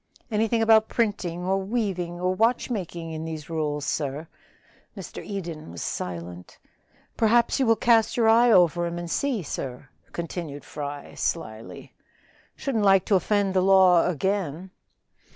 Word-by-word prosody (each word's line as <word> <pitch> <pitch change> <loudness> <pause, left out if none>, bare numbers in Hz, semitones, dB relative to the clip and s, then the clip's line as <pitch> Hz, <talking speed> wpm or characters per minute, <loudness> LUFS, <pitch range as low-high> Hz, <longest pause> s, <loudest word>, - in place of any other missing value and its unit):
"Anything 225 +1 +1
about 220 -1 +5
printing, 185 -7 -1
or 190 +1 +1
weaving, 190 -5 -2
or 180 +1 0
watchmaking 190 -6 -1
in 160 0 -5
these 160 -1 -7
rules, 150 -2 -2
sir?" 150 +1 -3 0.7
Mr. - - -8
Eden 170 - -6
was 85 -1 -7
silent. 90 0 -6 0.6
"Perhaps 235 +3 +3
you 265 - +2
will 225 - +5
cast 225 0 +3
your 230 -2 +3
eye 230 +2 +6
over 175 -3 +4
'em 170 0 -5
and 175 -1 -5
see, 260 -9 -1
sir," 130 -2 -6 0.2
continued 165 -4 -6
Fry 145 -1 -7
slyly. 110 -8 -5 0.6
"Shouldn't 235 -7 -1
like 195 -2 +5
to 205 - +2
offend 200 +1 +1
the 185 - +3
law 185 -2 +5
again." 185 0 -2
180 Hz, 140 wpm, -25 LUFS, 155-215 Hz, 0.7 s, eye